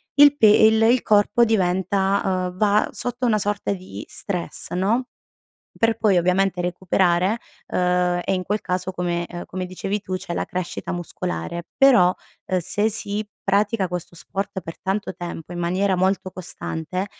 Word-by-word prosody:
il 290 0 +7
pe 220 - +6
il 220 +1 +6
il 235 +2 +4
corpo 210 +3 +4
diventa 190 -1 +1 0.3
uhm, 180 - -15
va 210 +1 +3
sotto 245 +1 -3
una 215 -3 +3
sorta 205 +1 -1
di 185 -1 -8
stress 180 -4 -4
no, 210 +8 +1 0.7
per 225 0 +2
poi 205 -4 +3
ovviamente 180 +1 +1
recuperare, 180 +2 +1 0.3
ehm, 180 0 +1
e - - 0
in 185 - -1
quel 205 +3 -1
caso 185 +1 -2
come, 175 -1 -2
ehm, 175 0 -7
come 185 0 -4
dicevi 195 +3 -3
tu 185 -1 -5
c'è 185 -1 -6
la - - -2
crescita 180 -1 -4
muscolare 170 - -4
però, 240 -10 +6 0.3
ehm, 185 - +1
se 205 +6 +1
si 210 0 -1 0.2
pratica 200 0 +2
questo 175 -1 -6
sport 195 +2 -4
per 165 -1 -9
tanto 195 +1 -2
tempo, 175 -1 -7
in 175 - -4
maniera 185 +3 +1
molto 185 +1 0
costante, 180 +1 -4
190 Hz, 160 wpm, -22 LUFS, 180-210 Hz, 0.7 s, il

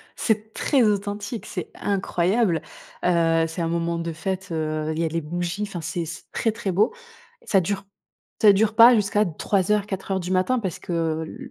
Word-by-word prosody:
C'est 220 -1 -1
très 275 -3 +2
authentique, 205 +1 -1
c'est 180 - -5
incroyable. 190 -1 +1 0.4
Heu, 165 -2 +3
c'est 165 +2 -5
un 165 - 0
moment 170 0 -1
de 165 0 -3
fête, 190 +3 -4
heu, 155 -1 -2
il - - -4
y 165 - +1
a - - +1
les 165 +1 -2
bougies. 175 +5 -3
Enfin 195 -5 -5
c'est 170 +2 -3
c'est 165 - -8
très, 225 - 0
très 215 -3 -3
beau. 205 - +2 0.5
Ça 195 - +3
dure 195 +3 -3 0.6
ça 210 -2 +8
dure 215 +2 +2
pas 235 +2 +9
jusqu'à 210 0 +2
03:00-04:00 195 +2 0
du 180 0 -4
matin. 185 +8 +2
Parce 190 -6 -4
que 165 -2 -1
l 160 - -9
185 Hz, 180 wpm, -24 LUFS, 165-210 Hz, 0.6 s, pas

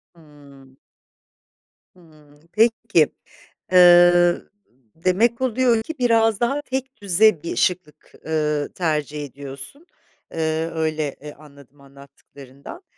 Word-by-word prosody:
Hımm. 140 -4 -19 1.2
Hımm. 155 -4 -22
Peki, 225 -7 +2 0.6
ııı, 175 -1 +5 0.5
demek 205 +8 0
oluyor 250 -2 +1
ki, 320 - -7
biraz 225 -3 +2
daha 275 +5 -1
tekdüze 220 - 0
bir 170 - -5
şıklık, 180 -4 -3
ııı, 150 -2 -1
tercih 150 -3 -3
ediyorsun. 140 - -11 0.5
Iıı, 160 0 -2
öyle, 155 -1 -2
e, 145 +1 -10
anladım 140 -2 -19
anlattıklarından. 140 - -15
165 Hz, 90 wpm, -21 LUFS, 145-220 Hz, 1.2 s, ııı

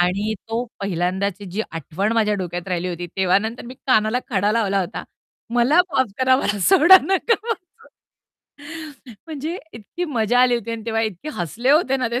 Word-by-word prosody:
आणि 195 +5 +1 0.2
तो 230 +2 -1 0.2
पहिल्यांदाची 190 +1 -2
जी 210 +5 -2
आठवण 170 +6 -2
माझ्या 215 -2 +2
डोक्यात 175 -1 -5
राहिली 180 0 -2
होती, 175 0 -5
तेव्हा 190 0 +3
नंतर 220 +3 -5
मी 250 - -9
कानाला 220 -1 +3
खडा 205 -1 +1
लावला 200 -4 +1
होता 185 +2 -4 0.5
"मला 255 +8 +4
माफ 260 -7 +1
करा, 260 0 +4
मला 210 -6 -1
सोडा 375 - +8
नका 390 +4 +2 0.2
पाजू." 360 -5 -14 1.4
म्हणजे 315 +3 -5
इतकी 230 - -6
मजा 245 -4 +1
आली 250 -1 +4
होती 230 0 -6
आणि 225 -1 -5
तेव्हा 225 -1 0
इतके 220 - -4
हसले 220 - -1
होते 290 -3 +3
ना 255 -2 -1
ते 245 - 0
220 Hz, 170 wpm, -21 LUFS, 190-255 Hz, 1.4 s, सोडा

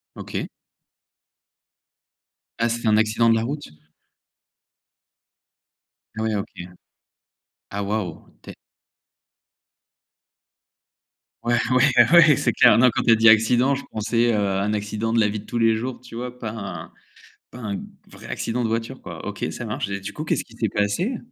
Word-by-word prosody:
OK. - - -5 2.1
Ah 115 - +2
c'était 115 -1 -2
un 105 - +4
accident 110 +1 +3
de 115 - +4
la 115 - 0
route? 145 +4 -5 2.5
Ouais, 110 0 -1
OK. 100 - -3 1.2
Waouh. 100 -3 -3
Tu - - -13
es - - -14 2.9
Ouais, 120 - +1 0.2
ouais, 125 -1 +4
ouais, 160 -5 +7
c'est - - +1
clair, 120 -3 +6
non, 125 +1 +6
quand - - -1
tu 115 - +5
as - - +8
dit 115 0 +5
accident, 120 +5 +4
je 140 - -7
pensais, 115 +2 +1
heu, - - +2
un 100 0 0
accident 105 +2 -3
de 115 - +3
la 105 - +3
vie 105 +1 -3
de 100 - -10
tous 120 - -4
les 115 -1 +3
jours, 125 +2 -5
tu 120 -2 -12
vois, 125 +1 -6
pas 115 -3 -5
un 100 -6 -7 0.6
pas 125 - -12
un 100 -3 -4 0.3
vrai - - -13
accident 120 +2 -3
de - - +1
voiture, 115 0 -3
quoi. - - -9
OK, - - -4
ça 120 - -6
marche. 115 +2 -3
Et 100 0 -4
du 100 - -6
coup, 155 +8 -6
qu'est-ce - - 0
qui - - -19
s'est - - 0
passé? 135 - -1
115 Hz, 160 wpm, -23 LUFS, 105-120 Hz, 2.9 s, as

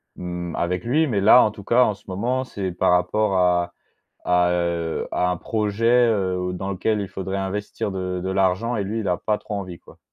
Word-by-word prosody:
mmh, 90 -1 -5
avec 90 +1 -1
lui, 150 +7 +2
mais 105 -6 0
là, 110 +5 +7
en 105 - +1
tout 105 -1 -11
cas, 120 +5 +4
en 105 - +1
ce 100 - -23
moment, 120 +8 -1
c'est 100 -7 -4
par 90 - +1
rapport 95 +3 +1
à 90 -1 +2 0.5
à, 90 0 +3
heu, 85 -2 -1
à 90 - +1
un 90 - -2
projet, 110 +2 -1 0.2
heu, 95 -4 0
dans 95 +2 -4
lequel 105 +3 0
il 100 - -4
faudrait 95 +1 -4
investir 100 +2 -3
de 90 -1 -3
de 95 - -2
l'argent 95 +5 +1
et 100 - -1
lui 110 +3 -3
il 100 - -3
a 90 - +1
pas 105 +3 -1
trop 105 - -7
envie, 95 -4 -5
quoi? - - -18
95 Hz, 220 wpm, -23 LUFS, 90-105 Hz, 0.5 s, là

